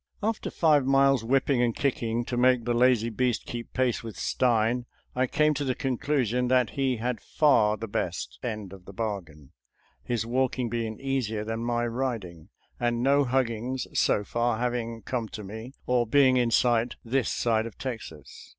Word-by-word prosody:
After 220 +1 -1
five 150 -4 +3
miles 135 -2 +3
whipping 130 +1 +2
and 120 -2 +1
kicking 120 -4 -1
to 125 - -3
make 125 -1 +3
the 120 - +1
lazy 120 -1 +3
beast 125 +1 0
keep 120 -1 -6
pace 130 -2 0
with 115 -2 -8
Stein, 120 0 +1 0.3
I 130 +1 +1
came 150 +3 +2
to 145 0 -2
the 130 -2 -1
conclusion 125 -2 0
that 125 -3 +2
he 135 -3 0
had 120 -1 -3
far 110 -8 +3
the 115 - -5
best 95 -5 -3
end 105 -5 -5
of 95 -2 -13
the 100 - -11
bargain 90 -10 -5 0.3
— - - -34
^his 115 -2 0
walking 125 0 0
being 115 -2 -3
easier 130 -6 -2
than 115 +1 -3
my 120 0 0
riding, 115 -9 -4 0.3
and 120 0 0
no 140 +1 +4
huggings, 125 0 -1
so 105 - +2
far, 120 +2 0
having 115 -2 -2
come 115 -2 -3
to 105 - -7
me, 110 +7 -8
or 125 -2 +1
being 130 +1 +5
in 120 -2 +2
sight, 120 0 +2
this 125 +2 0
side 115 -1 +1
of 115 - -12
Texas. 110 - -8
120 Hz, 180 wpm, -27 LUFS, 110-130 Hz, 0.3 s, being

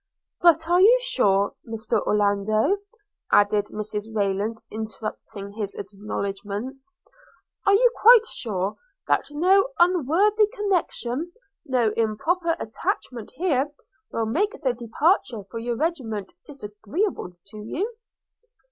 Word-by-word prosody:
'But 330 -2 +5
are 350 +1 +4
you 460 +6 +7
sure, 200 - +2
Mr 225 -1 -2
Orlando,' 210 - +2 0.5
added 205 0 +4
Mrs 210 0 -4
Rayland 205 +1 0 0.2
interrupting 215 -2 -6
his 205 -2 -4
acknowledgments 205 - -5 0.3
– - - -36
'are 400 - +6
you 485 +3 +5
quite 460 0 +8
sure 200 - -3 0.3
that - - +1
no 370 +9 +3
unworthy 365 - +3
connection, 350 - -2 0.3
no 245 -5 +2
improper 325 - 0
attachment 240 - -4
here, 290 -4 +1 0.4
will 230 - -1
make 350 - -1
the 255 -3 +2
departure 240 - 0
for 230 - -4
your 235 +1 -2
regiment 230 - -3
disagreeable 220 - -4 0.2
to 215 - -11
you?' 385 - -3
240 Hz, 110 wpm, -24 LUFS, 210-350 Hz, 0.5 s, quite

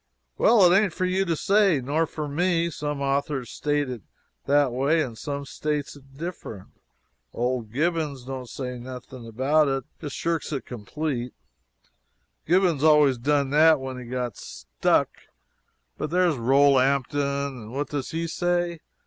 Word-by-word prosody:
"Well, 215 -5 +6
it 175 +1 +6
ain't 195 -3 +3
for 185 - -1
you 185 +1 +1
to 170 -2 0
say, 195 -2 +3
nor 150 +6 0
for 150 -1 -5
me. 170 +2 0
Some 145 -2 -4
authors 135 -2 -1
states 145 -2 -1
it 120 -4 -6 0.5
that 140 -2 +3
way, 140 +6 +1
and 120 -5 -6
some 140 +4 -5
states 150 0 -3
it 135 -1 -18
different. 160 - -7 0.7
Old 120 -2 -2
Gibbons 150 -2 -1
don't 130 -2 -6
say 125 -1 -5
nothing 125 -1 -9
about 140 +7 +2
it 135 -1 -1 0.2
just 145 -3 -6
shirks 165 -1 -2
it 140 -3 -3
complete 125 +2 -4 1.1
Gibbons 175 -5 +3
always 150 -5 +5
done 140 +1 +1
that 155 +1 +5
when 130 -1 -6
he 125 - -9
got 125 -2 -4
stuck 65 -2 0 0.9
but - - -2
there 180 +3 +2
is 165 - +1
Rolampton, 140 0 +2
what 140 +3 -3
does 145 -3 -3
he 165 +1 -2
say? 175 0 -1
140 Hz, 150 wpm, -25 LUFS, 130-160 Hz, 1.1 s, Well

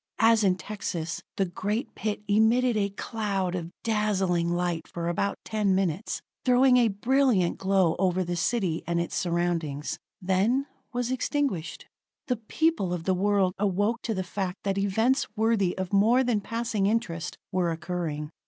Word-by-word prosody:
As 225 0 +5
in 190 -2 +4
Texas, 180 -4 -4 0.2
the 195 - +2
great 205 +8 -3
pit 210 -1 -3
emitted 225 +4 +3
a 200 -1 +1
cloud 200 -3 -2
of 170 -2 -4
dazzling 195 -6 +1
light 175 -1 -1
for 170 -1 -4
about 195 +3 -1
ten 210 -3 +1
minutes, 190 +1 -1 0.2
throwing 250 0 +5
a 240 -2 +5
brilliant 225 -2 +2
glow 190 -3 +2
over 185 -1 +2
the 175 0 -3
city 180 -3 0
and 170 0 +1
its 170 - -3
surroundings; 170 -4 -1 0.2
then 195 +9 +1 0.3
was 245 0 -2
extinguished. 260 - -2 0.4
The 250 - 0
people 225 - 0
of 175 -2 -3
the 190 - +2
world 195 0 +2
awoke 205 +4 +1
to 225 - -2
the 185 - -1
fact 185 0 -4
that 195 0 0
events 220 +7 +2
worthy 220 -4 +1
of 190 0 -4
more 225 +6 +5
than 235 -4 +1
passing 230 -2 -1
interest 200 -7 -2
were 180 -3 +1
occurring. 165 -3 -4
195 Hz, 155 wpm, -27 LUFS, 175-225 Hz, 0.4 s, As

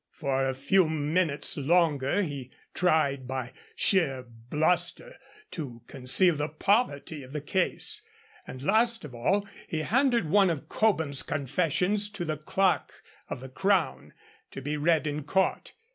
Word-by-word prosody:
For 135 -4 -1
a 130 0 -1
few 155 +6 +3
minutes 155 0 0
longer 150 +2 +2
he 140 -6 -5 0.2
tried 145 -7 +1
by 130 -1 -4 0.2
sheer 145 -10 +2 0.3
bluster 180 - 0 0.4
to 125 - -7
conceal 135 +8 +2
the 150 +1 -2
poverty 155 - 0
of 130 +1 -12
the 150 - -2
case, 185 - -1 0.5
and 130 0 -8
last 225 +2 +2
of 140 - -10
all 195 +13 0 0.2
he 155 - -2
handed 240 - +2
one 195 +3 +4
of 160 -5 -3
Cobham's 160 -11 +1
confessions 180 - 0
to 185 -4 -4
the 155 -1 -2
Clerk 185 +5 +1 0.4
of - - -5
the 130 - -8
Crown 190 +5 0 0.4
to - - -8
be 145 +3 -3
read 155 +1 +2
in 150 0 -3
court. 190 +7 0
155 Hz, 145 wpm, -28 LUFS, 140-190 Hz, 0.5 s, one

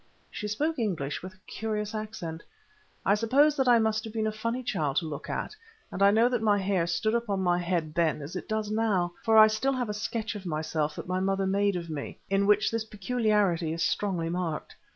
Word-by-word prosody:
She 210 - -4
spoke 295 +8 -1
English 170 -11 -2
with 185 +1 -9
a 185 - -32
curious 215 -1 -3
accent. 210 -7 -5 0.6
I 200 - +5
suppose 270 +8 +3
that 265 -2 +1
I 240 -1 +7
must 220 -1 +1
have 220 - -7
been 220 -1 -1
a 215 - 0
funny 230 +4 -3
child 155 - -1
to 170 - +1
look 150 -3 -6
at, - - -3 0.4
and 190 - -5
I 200 - +7
know 225 +3 +4
that 245 -2 0
my 210 -2 +3
hair 190 -3 0
stood 170 +6 0
up 235 -1 -1
on 200 -1 0
my 175 -1 +2
head 170 -3 -1
then 165 -2 +1
as 150 +6 -8
it - - -6
does 215 -1 -1
now, 205 -6 +1
for 225 -1 +4
I 215 - +11
still 220 +6 +1
have 250 -4 -2
a - - -1
sketch 220 +2 -3
of 205 -3 -7
myself 155 -2 -2
that - - -7
my 185 +1 0
mother 195 0 0
made 200 +1 +1
of 170 -1 -4
me, 155 -3 -6
in 200 0 +2
which 210 +1 +4
this 225 -1 -1
peculiarity 210 -6 0
is 165 0 -1
strongly 180 -5 0
marked. 170 -3 -3
205 Hz, 230 wpm, -28 LUFS, 175-220 Hz, 0.6 s, I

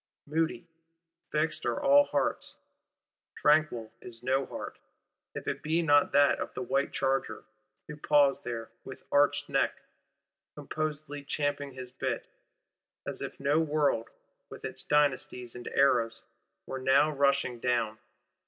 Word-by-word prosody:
Moody, 160 +3 -1 0.7
fixed 155 +1 0
are - - -1
all 285 0 +6
hearts: - - -1 0.8
tranquil 150 -7 +2
is 120 -1 -8
no 130 +1 +1
heart,—if - - -10
it - - -2
be 160 +3 +1
not 145 -2 +4
that 145 0 +4
of - - -4
the 130 - -3
white 135 +3 0
charger, 135 0 -1 0.4
who 150 - -7
paws 145 -2 +3
there, 115 -2 -5
with 130 - -10
arched 145 0 +3
neck, - - +1 0.8
composedly 150 -2 -4
champing 145 -1 -2
his 130 -1 -8
bit; 130 - -3 0.8
as - - -5
if - - -6
no 140 +3 +2
world, 150 -7 +1 0.4
with - - -9
its - - -6
Dynasties 130 -4 0
and 120 - -8
Eras, 120 -5 +2 0.4
were 130 - -5
now 135 +4 +4
rushing 140 -3 +1
down. 115 -3 0
140 Hz, 130 wpm, -29 LUFS, 125-150 Hz, 0.8 s, all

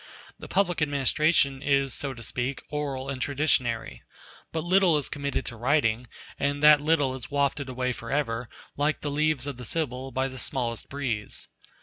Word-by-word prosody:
The - - -8
public 180 -4 +1
administration 145 -1 +2
is, 140 -2 +2
so 135 -2 -2
to 120 - -7
speak, 130 +4 -2
oral 140 -3 -3
and 135 -2 -4
traditionary. 135 -5 0 0.5
But 160 -1 -2
little 180 -2 +4
is 145 - -1
committed 140 0 -2
to 120 - -5
writing, 120 -1 +1 0.3
and 145 +1 0
that 150 -1 +8
little 145 -3 +2
is 125 -3 -7
wafted 140 -1 0
away 125 0 -1
forever, 120 -1 -2 0.3
like 145 +2 0
the 145 - -2
leaves 150 -2 +1
of 140 -4 -4
the 125 - -8
Sibyl, 130 -1 -2
by 130 +1 0
the 130 -1 -8
smallest 120 -4 -2
breeze. 125 -7 -3
140 Hz, 165 wpm, -27 LUFS, 125-150 Hz, 0.5 s, that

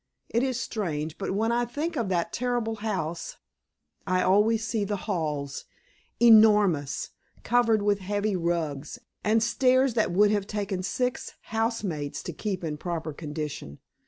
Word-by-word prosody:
It 235 - +1
is 260 -2 0
strange, 160 -10 -3
but 195 -1 -2
when 225 +3 +1
I 240 +1 +2
think 290 +8 -3
of 230 -5 -1
that 175 -2 -1
terrible 240 -2 -1
house, 185 -6 -3 0.7
I 185 0 +2
always 215 +4 +3
see 225 -2 -1
the 205 +1 -1
halls, 150 -8 -2 0.5
enormous, 210 - +5 0.3
covered 230 -3 +3
with 205 -1 +2
heavy 205 +1 -1
rugs, 165 - -2 0.3
and 220 +1 +3
stairs 255 +2 +3
that 220 -5 +1
would 205 +3 +4
have 205 -2 0
taken 200 -3 -2
six 250 +7 -2
housemaids 215 - -2
to 175 - -5
keep 190 +3 -3
in 155 -2 -3
proper 165 -1 -4
condition. 150 - -6
205 Hz, 145 wpm, -27 LUFS, 170-225 Hz, 0.7 s, enormous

